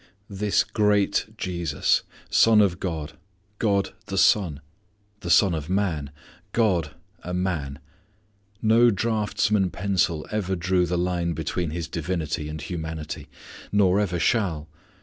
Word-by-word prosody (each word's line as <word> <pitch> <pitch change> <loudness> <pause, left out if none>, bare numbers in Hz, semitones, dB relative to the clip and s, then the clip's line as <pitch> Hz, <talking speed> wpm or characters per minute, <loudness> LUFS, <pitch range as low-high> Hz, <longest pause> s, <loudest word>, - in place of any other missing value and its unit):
This 100 +1 +1
great 105 -1 +1
Jesus! 85 -7 0 0.3
Son 115 -1 +6
of 95 -4 +3
God: 80 -4 -5 0.4
God 100 -3 +1
the - - -4
Son. 85 -9 +3 0.6
The 85 - -6
Son 90 +2 +5
of 80 -1 -4
Man: 90 -7 -1 0.4
God 90 -10 +1 0.3
a 90 0 -4
man! 80 -7 -2 0.9
No 115 +2 +5
draughtsman's 105 -2 +1
pencil 90 -5 0
ever 95 -3 -1
drew 90 0 +1
the 90 +1 -1
line 85 -1 0
between 80 +2 -2
His 80 0 -4
divinity 80 -3 -3
and 80 0 -5
humanity; 80 -1 -6 0.4
nor 100 -1 +3
ever 95 -4 0
shall. 85 -5 0
90 Hz, 125 wpm, -25 LUFS, 80-100 Hz, 0.9 s, Son